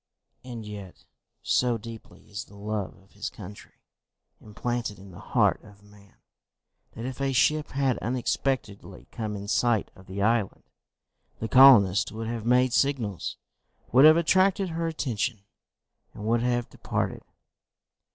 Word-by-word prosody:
And 120 -3 -8
yet 100 -3 -10 0.4
so 120 -2 +2
deeply 115 +1 -12
is 100 0 -6
the 100 - -17
love 105 -1 -4
of 95 +1 -24
his 105 +1 -5
country 100 0 -12 0.6
implanted 115 0 -4
in 95 +1 -13
the 85 - -12
heart - - +1
of 100 -1 -17
man, 105 -1 -20 0.8
that 115 - -7
if 130 +1 -6
a 135 0 +1
ship 150 +3 +2
had 135 -2 +1
unexpectedly 125 -2 -3
come 110 -2 -4
in 100 0 -7
sight 115 0 +1
of 95 - -17
the 100 +1 -3
island, 115 -2 0 0.8
the 110 - -3
colonists 115 -7 +6
would 115 +1 -6
have 115 0 -4
made 125 0 +3
signals, 115 -11 -1 0.5
would 130 +4 +7
have 155 +1 +8
attracted 185 +3 +2
her 165 0 -2
attention, 125 -8 -2 0.7
and 105 - -7
would 115 +1 +2
have 120 0 0
departed! - - -3
115 Hz, 140 wpm, -26 LUFS, 105-130 Hz, 0.8 s, have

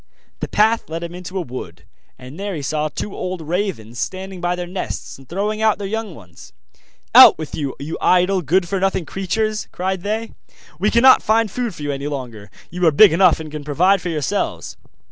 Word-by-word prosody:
The - - -3
path 220 -1 +2
led 165 +1 -4
him 170 0 -6
into 180 +2 -7
a - - 0
wood, 95 - -8 0.3
and 130 +7 -11
there 200 -1 -4
he 150 - -5
saw 155 +2 -1
two 195 - -6
old 185 0 -4
ravens 160 - -3
standing 190 -1 -5
by 175 0 0
their 180 0 -4
nest, 180 -5 -6
and 135 - -17
throwing 210 +4 -2
out 220 -1 +3
their 205 - -5
young 220 -3 -4
ones. 90 -7 -15 0.6
'Out - - +10
with 155 -2 -7
you, 140 -3 -3
you 150 +4 -6
idle, 185 +1 +3
good 175 +4 +1
for 195 +2 -1
nothing 190 -2 0
creatures!' 215 +5 -2
cried 190 0 -3
they; 220 +3 -3 0.5
'we 205 +3 +2
cannot 255 +4 +6
find 220 -1 +1
food 240 -5 -3
for 150 - -8
you 145 - -2
any 140 +1 -4
longer; 120 -8 -6 0.2
you 180 +2 -4
are - - +6
big 185 +5 +7
enough, 180 -1 +4
and 155 -1 -8
can 150 -1 -6
provide 175 +7 +2
for 175 - -4
yourselves. 150 -5 -2
180 Hz, 205 wpm, -20 LUFS, 150-200 Hz, 0.6 s, Out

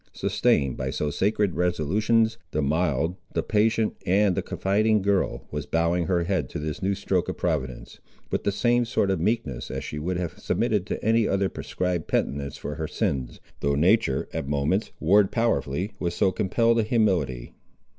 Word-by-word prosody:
Sustained 70 -3 +1
by 65 0 -2
so 75 +2 -2
sacred 100 +2 +1
resolutions, 105 +7 +1
the 75 - -1
mild, 80 +2 0 0.2
the - - +1
patient 110 +1 +1
and 100 +1 +3
the - - -1
confiding 105 +1 +1
girl 100 -1 0
was 75 -1 -4
bowing 85 +1 +1
her 90 -2 +1
head 85 -7 -1
to - - -5
this 75 +2 -4
new 100 +1 +1
stroke - - -1
of - - -4
Providence, 65 -2 -3 0.3
with - - -1
the 100 - +1
same 120 +4 +2
sort 100 -4 0
of 95 - 0
meekness 85 - -1
as - - -4
she 75 - -5
would 90 +4 -2
have 85 -3 -4
submitted - - 0
to - - -4
any 115 0 +3
other 100 -1 +1
prescribed 90 -3 -3
penitence 70 0 -1
for - - -5
her - - -3
sins, 65 -3 -2 0.2
though 70 0 +1
nature, 85 -2 +2
at 70 - -3
moments, 75 +9 0
warred 95 +4 +4
powerfully, 95 - 0
with 85 -1 -2
so 95 - +3
compelled 115 +4 +2
a - - +5
humility. 95 - 0
90 Hz, 175 wpm, -25 LUFS, 75-105 Hz, 0.3 s, a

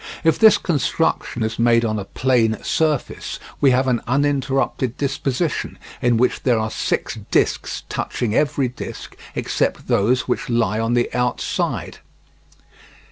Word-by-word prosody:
If 160 -2 +3
this 220 -1 +7
construction 140 -6 0
is 110 +1 -3
made 115 0 +4
on 110 -1 -1
a 100 - -5
plane 115 -1 +1
surface, 155 -4 -1 0.2
we 140 - +5
have 130 +1 +2
an 125 -3 +1
uninterrupted 135 -2 0
disposition 140 +2 -2 0.2
in 120 -1 +3
which 125 +2 +1
there 125 -3 +2
are 110 0 -1
six - - -2
discs - - 0
touching 115 -4 -2
every 140 -1 +1
disc 125 - -8 0.2
except - - -1
those 125 +6 +2
which 125 - -2
lie 110 -3 +1
on 115 +1 0
the 120 - 0
outside. 125 0 -2
125 Hz, 135 wpm, -21 LUFS, 115-135 Hz, 0.2 s, this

